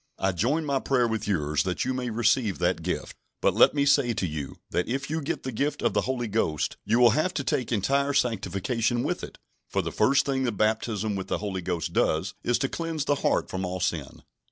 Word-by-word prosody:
I 95 Hz, -, +1 dB
join 130 Hz, -, 0 dB
my 140 Hz, -2 st, +1 dB
prayer 125 Hz, -3 st, +2 dB
with 110 Hz, -2 st, -2 dB
yours 75 Hz, -6 st, +1 dB
that 90 Hz, -1 st, -1 dB
you 130 Hz, -, 0 dB
may 125 Hz, -1 st, -2 dB
receive 115 Hz, -2 st, +1 dB
that 90 Hz, -1 st, 0 dB
gift. 90 Hz, +2 st, -3 dB, 0.2 s
But -, -, +2 dB
let -, -, +5 dB
me 140 Hz, -1 st, +2 dB
say 140 Hz, -4 st, +4 dB
to 95 Hz, -, -1 dB
you, 75 Hz, -4 st, -5 dB, 0.2 s
that 90 Hz, -, 0 dB
if 135 Hz, +4 st, -3 dB
you 160 Hz, 0 st, -1 dB
get 140 Hz, -, -3 dB
the 130 Hz, -, -3 dB
gift 140 Hz, +6 st, -2 dB
of -, -, +2 dB
the -, -, +2 dB
Holy 125 Hz, -2 st, -2 dB
Ghost, 95 Hz, -9 st, 0 dB
you 110 Hz, +3 st, +2 dB
will 120 Hz, -1 st, +7 dB
have 155 Hz, +9 st, 0 dB
to 140 Hz, -, -1 dB
take 130 Hz, -3 st, -1 dB
entire 140 Hz, +7 st, +1 dB
sanctification 115 Hz, 0 st, 0 dB
with -, -, -2 dB
it, -, -, -8 dB, 0.3 s
for -, -, 0 dB
the -, -, -3 dB
first 135 Hz, +1 st, +3 dB
thing 135 Hz, -1 st, 0 dB
the 125 Hz, -2 st, +1 dB
baptism 110 Hz, 0 st, 0 dB
with 95 Hz, -1 st, -4 dB
the -, -, -1 dB
Holy 100 Hz, -3 st, -3 dB
Ghost 85 Hz, -2 st, -3 dB
does 85 Hz, +5 st, +1 dB
is 120 Hz, -, +2 dB
to 135 Hz, -, 0 dB
cleanse 165 Hz, -1 st, -3 dB
the 145 Hz, -, +3 dB
heart -, -, +1 dB
from 95 Hz, 0 st, -4 dB
all 90 Hz, 0 st, -3 dB
sin." 85 Hz, -6 st, -3 dB
115 Hz, 230 wpm, -27 LUFS, 95-135 Hz, 0.3 s, will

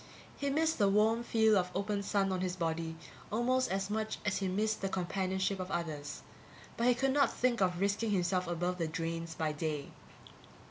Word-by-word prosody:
He 280 Hz, -, -2 dB
missed 320 Hz, +3 st, +1 dB
the 200 Hz, -1 st, +5 dB
warm 215 Hz, +3 st, +3 dB
feel 220 Hz, -2 st, +4 dB
of 180 Hz, -2 st, +2 dB
open 200 Hz, +1 st, -1 dB
sun 200 Hz, -1 st, +1 dB
on 185 Hz, -1 st, -1 dB
his 185 Hz, -1 st, -1 dB
body 165 Hz, -2 st, -2 dB, 0.4 s
almost 255 Hz, +4 st, +2 dB
as 195 Hz, 0 st, -1 dB
much 220 Hz, 0 st, -1 dB
as 210 Hz, -, +1 dB
he 195 Hz, -, -1 dB
missed 215 Hz, +4 st, 0 dB
the 195 Hz, -, -1 dB
companionship 190 Hz, +1 st, -1 dB
of 185 Hz, 0 st, -4 dB
others, 155 Hz, -5 st, -4 dB, 0.5 s
but 235 Hz, -, +1 dB
he 250 Hz, -, +5 dB
could 265 Hz, +2 st, +1 dB
not 280 Hz, -1 st, +4 dB
think 240 Hz, -3 st, +1 dB
of 180 Hz, -2 st, +2 dB
risking 200 Hz, +3 st, +1 dB
himself 180 Hz, -2 st, +1 dB
above 175 Hz, +1 st, -1 dB
the 165 Hz, -, 0 dB
drains 165 Hz, +1 st, -3 dB
by 155 Hz, -1 st, 0 dB
day. 150 Hz, -1 st, -3 dB
195 Hz, 190 wpm, -33 LUFS, 175-220 Hz, 0.5 s, the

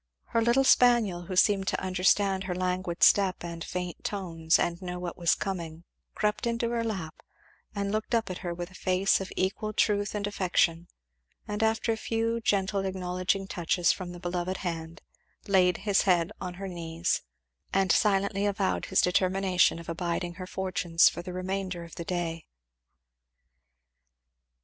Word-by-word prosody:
Her 230 Hz, -, +1 dB
little 235 Hz, +4 st, +3 dB
spaniel, 235 Hz, -9 st, +4 dB
who 185 Hz, -, -4 dB
seemed 195 Hz, +1 st, +3 dB
to -, -, 0 dB
understand 190 Hz, +1 st, +2 dB
her 180 Hz, -1 st, -3 dB
languid 180 Hz, -1 st, -1 dB
step 195 Hz, -3 st, +4 dB
and 170 Hz, -1 st, -6 dB
faint 180 Hz, -2 st, -5 dB
tones 165 Hz, -5 st, 0 dB
and 170 Hz, +1 st, -1 dB
know 180 Hz, -1 st, -5 dB
what 180 Hz, -1 st, -5 dB
was 170 Hz, -2 st, +2 dB
coming, 170 Hz, -4 st, -5 dB, 0.3 s
crept 210 Hz, +2 st, 0 dB
into 235 Hz, 0 st, -1 dB
her 235 Hz, -1 st, 0 dB
lap 190 Hz, -8 st, -5 dB, 0.5 s
and 200 Hz, 0 st, -1 dB
looked 215 Hz, +2 st, -1 dB
up 225 Hz, -4 st, 0 dB
at 180 Hz, -, -6 dB
her 175 Hz, -, -4 dB
with 175 Hz, +1 st, -6 dB
a -, -, -16 dB
face 185 Hz, +1 st, +1 dB
of 195 Hz, -, -6 dB
equal 205 Hz, +3 st, -1 dB
truth 205 Hz, -1 st, +1 dB
and 205 Hz, -1 st, -1 dB
affection; 175 Hz, -4 st, +1 dB, 0.6 s
and 210 Hz, +1 st, -3 dB
after 225 Hz, +1 st, +1 dB
a 225 Hz, -, -1 dB
few 230 Hz, +1 st, -1 dB
gentle 195 Hz, -1 st, +1 dB
acknowledging 185 Hz, 0 st, -1 dB
touches 175 Hz, -2 st, +1 dB
from 185 Hz, -2 st, -5 dB
the 175 Hz, 0 st, -6 dB
loved 180 Hz, +1 st, -2 dB
hand, 165 Hz, -2 st, -5 dB, 0.4 s
laid 185 Hz, -2 st, +4 dB
his 205 Hz, -2 st, +3 dB
head 180 Hz, -1 st, +2 dB
on 180 Hz, -1 st, -5 dB
her 195 Hz, +2 st, -6 dB
knees, 170 Hz, -1 st, -2 dB, 0.5 s
and 195 Hz, -1 st, +2 dB
silently 200 Hz, 0 st, +2 dB
avowed 200 Hz, -1 st, 0 dB
his 190 Hz, -, +3 dB
determination 185 Hz, -1 st, +2 dB
of 170 Hz, -, -10 dB
abiding 170 Hz, +1 st, -2 dB
her 185 Hz, -, -6 dB
fortunes 180 Hz, -3 st, +2 dB
for -, -, -7 dB
the 180 Hz, -, -7 dB
remainder 185 Hz, -1 st, -3 dB
of 170 Hz, -, -12 dB
the 170 Hz, -, -6 dB
day. 165 Hz, -2 st, -3 dB
185 Hz, 165 wpm, -28 LUFS, 175-200 Hz, 0.6 s, spaniel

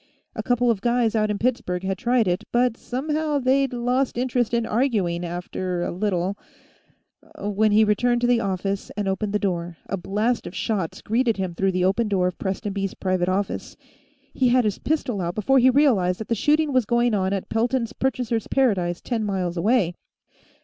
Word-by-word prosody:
A -, -, -2 dB
couple 245 Hz, -1 st, +2 dB
of 205 Hz, -4 st, -2 dB
guys 235 Hz, -1 st, +1 dB
out 215 Hz, -1 st, +2 dB
in 210 Hz, -, -1 dB
Pittsburgh 225 Hz, -6 st, -1 dB
had 190 Hz, 0 st, -1 dB
tried 240 Hz, -2 st, +2 dB
it, 180 Hz, 0 st, 0 dB
but 240 Hz, -1 st, +2 dB
somehow 300 Hz, +5 st, -2 dB
they'd 270 Hz, 0 st, +2 dB
lost 245 Hz, +1 st, 0 dB
interest 245 Hz, -2 st, 0 dB
in 235 Hz, -1 st, +1 dB
arguing, 210 Hz, -9 st, 0 dB
after 175 Hz, +1 st, -3 dB
a -, -, -2 dB
little 185 Hz, 0 st, -1 dB, 1.0 s
When 210 Hz, -4 st, +1 dB
he 215 Hz, +1 st, +5 dB
returned 240 Hz, +3 st, +2 dB
to 240 Hz, -, +2 dB
the 245 Hz, -1 st, +3 dB
office 195 Hz, -1 st, -2 dB
and 205 Hz, -1 st, -1 dB
opened 200 Hz, +2 st, -1 dB
the 210 Hz, -, +2 dB
door, 175 Hz, -4 st, -2 dB
a 195 Hz, -, -2 dB
blast 210 Hz, +6 st, -1 dB
of 175 Hz, -, -9 dB
shots 195 Hz, -7 st, -2 dB
greeted 230 Hz, 0 st, +1 dB
him 185 Hz, -2 st, -2 dB
through 190 Hz, +2 st, 0 dB
the 180 Hz, 0 st, +1 dB
open 205 Hz, +5 st, +1 dB
door 190 Hz, -3 st, +1 dB
of 180 Hz, -1 st, -2 dB
Prestonby's 195 Hz, 0 st, -3 dB
private 185 Hz, -1 st, 0 dB
office. 195 Hz, +1 st, -2 dB, 0.6 s
He 255 Hz, -, +2 dB
had 250 Hz, -1 st, +3 dB
his 210 Hz, -2 st, -1 dB
pistol 265 Hz, -9 st, -1 dB
out 175 Hz, 0 st, -3 dB
before 265 Hz, +6 st, +3 dB
he 255 Hz, +1 st, +6 dB
realized 235 Hz, -10 st, +3 dB
that 220 Hz, -, -7 dB
the -, -, +2 dB
shooting 295 Hz, +6 st, +2 dB
was 255 Hz, -3 st, +3 dB
going 235 Hz, +1 st, +2 dB
on 190 Hz, -2 st, +1 dB
at 195 Hz, -1 st, -3 dB
Pelton's 235 Hz, +1 st, 0 dB
Purchasers' 245 Hz, -4 st, -1 dB
Paradise, 190 Hz, -10 st, +1 dB
ten 230 Hz, -3 st, -2 dB
miles 185 Hz, -4 st, -2 dB
away. 190 Hz, 0 st, +2 dB
215 Hz, 190 wpm, -23 LUFS, 190-245 Hz, 1.0 s, he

